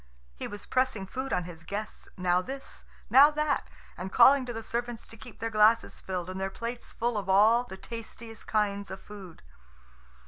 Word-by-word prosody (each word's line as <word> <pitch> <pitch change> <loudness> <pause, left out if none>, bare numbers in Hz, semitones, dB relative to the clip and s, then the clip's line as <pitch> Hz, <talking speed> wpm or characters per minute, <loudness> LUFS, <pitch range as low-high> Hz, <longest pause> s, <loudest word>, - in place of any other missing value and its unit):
He - - -5
was 205 0 -7
pressing 255 -6 0
food 260 +7 -5
on 180 - +1
his 170 -1 -10
guests, 205 +5 -6
now 180 -1 +2
this, 270 +7 -7 0.3
now 280 +3 +9
that, 300 -1 -1 0.3
and 190 +1 -6
calling 260 +3 +6
to - - -3
the 225 -1 -6
servants 235 +1 -4
to - - -12
keep 230 +1 -12
their 225 0 -3
glasses 215 +1 +3
filled 180 -2 -4
and 185 +1 -5
their 195 - -1
plates 235 +4 -6
full 235 -2 -1
of 195 -1 -7
all 220 +5 +5
the 190 -5 -9
tastiest 230 0 -9
kinds 200 -2 0
of 190 - -7
food. 195 -6 -12
220 Hz, 185 wpm, -29 LUFS, 190-240 Hz, 0.3 s, now